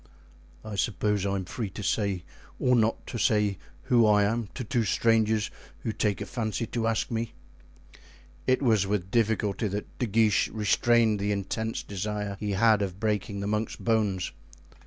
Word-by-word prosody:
"I 105 Hz, -2 st, -5 dB
suppose 105 Hz, -1 st, 0 dB
I 100 Hz, -, 0 dB
am 95 Hz, -2 st, -3 dB
free 110 Hz, +2 st, -4 dB
to 100 Hz, +3 st, -7 dB
say 100 Hz, -3 st, 0 dB, 0.3 s
or 125 Hz, 0 st, +3 dB
not 115 Hz, -1 st, +1 dB
to 120 Hz, -, -5 dB
say 105 Hz, -3 st, +2 dB, 0.2 s
who 120 Hz, -3 st, +4 dB
I 105 Hz, -1 st, +5 dB
am 110 Hz, +1 st, 0 dB
to 125 Hz, -, -3 dB
two 120 Hz, 0 st, 0 dB
strangers 110 Hz, 0 st, +2 dB, 0.3 s
who 115 Hz, -, -2 dB
take 105 Hz, -2 st, 0 dB
a -, -, -2 dB
fancy 115 Hz, -1 st, -2 dB
to 115 Hz, 0 st, -2 dB
ask 115 Hz, +1 st, 0 dB
me." 115 Hz, 0 st, -2 dB, 1.1 s
It 130 Hz, +2 st, +3 dB
was 110 Hz, -6 st, +3 dB
with 95 Hz, -2 st, -2 dB
difficulty 110 Hz, -2 st, +1 dB
that 105 Hz, +1 st, -6 dB
De 125 Hz, -, 0 dB
Guiche 110 Hz, 0 st, +3 dB
restrained 110 Hz, +1 st, +3 dB
the 100 Hz, +1 st, 0 dB
intense 105 Hz, +3 st, -2 dB
desire 105 Hz, 0 st, -3 dB
he 105 Hz, -1 st, -2 dB
had 110 Hz, +1 st, +4 dB
of 95 Hz, -1 st, -3 dB
breaking 105 Hz, -2 st, -1 dB
the -, -, -3 dB
monk's 105 Hz, +1 st, -1 dB
bones. 105 Hz, -5 st, 0 dB
105 Hz, 170 wpm, -27 LUFS, 100-115 Hz, 1.1 s, I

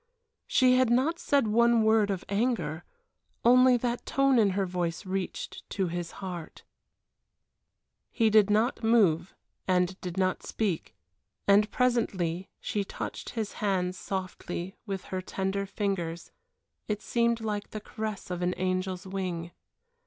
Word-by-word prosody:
She 255 Hz, -1 st, +4 dB
had 255 Hz, -2 st, +4 dB
not 260 Hz, +8 st, +2 dB
said 280 Hz, -4 st, +2 dB
one 235 Hz, +1 st, +4 dB
word 220 Hz, -1 st, +4 dB
of 190 Hz, -2 st, -2 dB
anger 200 Hz, -7 st, -1 dB, 0.6 s
only 250 Hz, +1 st, +7 dB
that 240 Hz, 0 st, -2 dB
tone 275 Hz, -2 st, +3 dB
in 210 Hz, -3 st, +5 dB
her 195 Hz, -, +2 dB
voice 175 Hz, 0 st, -3 dB
reached 190 Hz, 0 st, -4 dB
to 190 Hz, -3 st, -1 dB
his 175 Hz, 0 st, -4 dB
heart. 175 Hz, -4 st, -7 dB, 1.5 s
He 225 Hz, -3 st, +2 dB
did 210 Hz, -1 st, +6 dB
not 220 Hz, +5 st, +2 dB
move 195 Hz, -7 st, +3 dB, 0.3 s
and 185 Hz, 0 st, +1 dB
did 180 Hz, -1 st, -5 dB
not 185 Hz, -1 st, +1 dB
speak, 200 Hz, -7 st, -2 dB, 0.5 s
and 205 Hz, +1 st, +5 dB
presently 195 Hz, -8 st, 0 dB
she 205 Hz, -, -2 dB
touched -, -, -6 dB
his 215 Hz, -2 st, -2 dB
hands 185 Hz, -3 st, 0 dB
softly 185 Hz, -1 st, -5 dB
with 195 Hz, -2 st, -3 dB
her 185 Hz, -1 st, -4 dB
slender 195 Hz, +1 st, -2 dB
fingers, 175 Hz, -5 st, -3 dB, 0.6 s
it 210 Hz, 0 st, -2 dB
seemed 235 Hz, -1 st, +1 dB
like 210 Hz, -2 st, -3 dB
the 215 Hz, -, -5 dB
caress 215 Hz, -3 st, -5 dB
of 180 Hz, 0 st, -3 dB
an 180 Hz, 0 st, 0 dB
angel's 185 Hz, 0 st, -2 dB
wing. 180 Hz, -3 st, -4 dB
200 Hz, 140 wpm, -29 LUFS, 180-225 Hz, 1.5 s, only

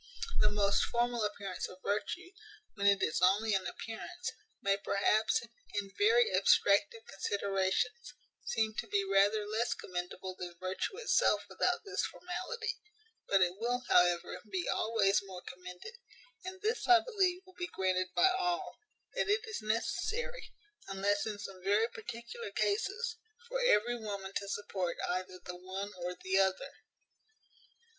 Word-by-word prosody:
The -, -, +5 dB
most 200 Hz, -1 st, +3 dB
formal 240 Hz, -1 st, 0 dB
appearance 200 Hz, -3 st, -3 dB
of 185 Hz, 0 st, -13 dB
virtue, 350 Hz, -, -2 dB, 0.4 s
when 200 Hz, -1 st, +1 dB
it 200 Hz, -1 st, +5 dB
is 155 Hz, -, +1 dB
only 205 Hz, +4 st, +4 dB
an 190 Hz, -2 st, +1 dB
appearance, 345 Hz, +11 st, -5 dB, 0.3 s
may, 195 Hz, 0 st, +2 dB
perhaps, 205 Hz, +3 st, +2 dB, 0.3 s
in 200 Hz, -1 st, -2 dB
very 455 Hz, +3 st, +4 dB
abstracted 225 Hz, +3 st, +4 dB
considerations, 195 Hz, -, -1 dB, 0.3 s
seem 220 Hz, -1 st, 0 dB
to 235 Hz, -, -4 dB
be 200 Hz, -1 st, +1 dB
rather 200 Hz, +2 st, +3 dB
less 220 Hz, +3 st, 0 dB
commendable 180 Hz, +1 st, -5 dB
than 175 Hz, -1 st, -6 dB
virtue 185 Hz, -, -3 dB
itself 475 Hz, -, +3 dB
without -, -, 0 dB
this 395 Hz, 0 st, -1 dB
formality; 445 Hz, +7 st, -4 dB, 0.5 s
but 195 Hz, -1 st, +4 dB
it 175 Hz, 0 st, +1 dB
will, 245 Hz, +2 st, 0 dB
however, 175 Hz, -1 st, +3 dB
be 370 Hz, -3 st, -2 dB
always 215 Hz, -3 st, +2 dB
more 185 Hz, -2 st, -9 dB
commended; 180 Hz, -, -9 dB, 0.5 s
and 375 Hz, +1 st, -7 dB
this, 445 Hz, +2 st, 0 dB
I 360 Hz, -1 st, +8 dB
believe, 380 Hz, -6 st, +1 dB
will 370 Hz, -, -17 dB
be 350 Hz, -1 st, -4 dB
granted 185 Hz, -1 st, +1 dB
by 380 Hz, -, +6 dB
all, 360 Hz, -2 st, -1 dB, 0.3 s
that -, -, 0 dB
it 430 Hz, +2 st, +2 dB
is 440 Hz, -, -4 dB
necessary, 435 Hz, -, -2 dB, 0.4 s
unless 200 Hz, +2 st, 0 dB
in 210 Hz, -1 st, -3 dB
some 195 Hz, -3 st, -8 dB
very 205 Hz, +4 st, +3 dB
particular 235 Hz, -, -7 dB
cases, 425 Hz, +3 st, 0 dB, 0.3 s
for -, -, -2 dB
every 240 Hz, -, +3 dB
woman 200 Hz, -3 st, -5 dB
to 200 Hz, -, -5 dB
support 195 Hz, -4 st, -2 dB
either 185 Hz, 0 st, -2 dB
the 180 Hz, -, -6 dB
one 190 Hz, +3 st, -5 dB
or 180 Hz, 0 st, -4 dB
the 190 Hz, +1 st, +1 dB
other. 195 Hz, +8 st, +1 dB
210 Hz, 145 wpm, -33 LUFS, -, 0.5 s, I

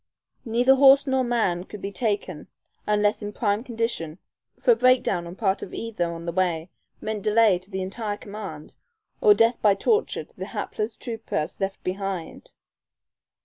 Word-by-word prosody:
Neither 245 Hz, +3 st, +4 dB
horse 275 Hz, 0 st, +7 dB
nor 265 Hz, -1 st, +1 dB
man 220 Hz, -8 st, 0 dB
could 210 Hz, -, -9 dB
be 200 Hz, +1 st, -5 dB
taken 200 Hz, -7 st, -2 dB, 0.4 s
unless 210 Hz, 0 st, +2 dB
in 205 Hz, 0 st, -5 dB
prime 210 Hz, -1 st, 0 dB
condition, 230 Hz, -10 st, -3 dB, 0.4 s
for -, -, +4 dB
a -, -, +6 dB
break 255 Hz, -, +4 dB
down 170 Hz, -1 st, -1 dB
on 170 Hz, -, -8 dB
part 195 Hz, -2 st, 0 dB
of -, -, -7 dB
either 210 Hz, -7 st, -2 dB
on 170 Hz, 0 st, -7 dB
the 170 Hz, -, -2 dB
way 175 Hz, -1 st, -1 dB, 0.3 s
meant 215 Hz, -1 st, -4 dB
delay 210 Hz, -3 st, +4 dB
to 185 Hz, +2 st, -18 dB
the 190 Hz, -2 st, -3 dB
entire 205 Hz, +2 st, -4 dB
command, 200 Hz, -8 st, -8 dB, 0.5 s
or 425 Hz, -3 st, +7 dB
death 230 Hz, -4 st, +3 dB
by 205 Hz, -2 st, +5 dB
torture 445 Hz, -, +1 dB
to -, -, -20 dB
the -, -, -6 dB
hapless 215 Hz, +1 st, -3 dB
trooper 225 Hz, -10 st, -3 dB
left 195 Hz, 0 st, -3 dB
behind. 190 Hz, -2 st, -4 dB
210 Hz, 170 wpm, -25 LUFS, 185-230 Hz, 0.5 s, horse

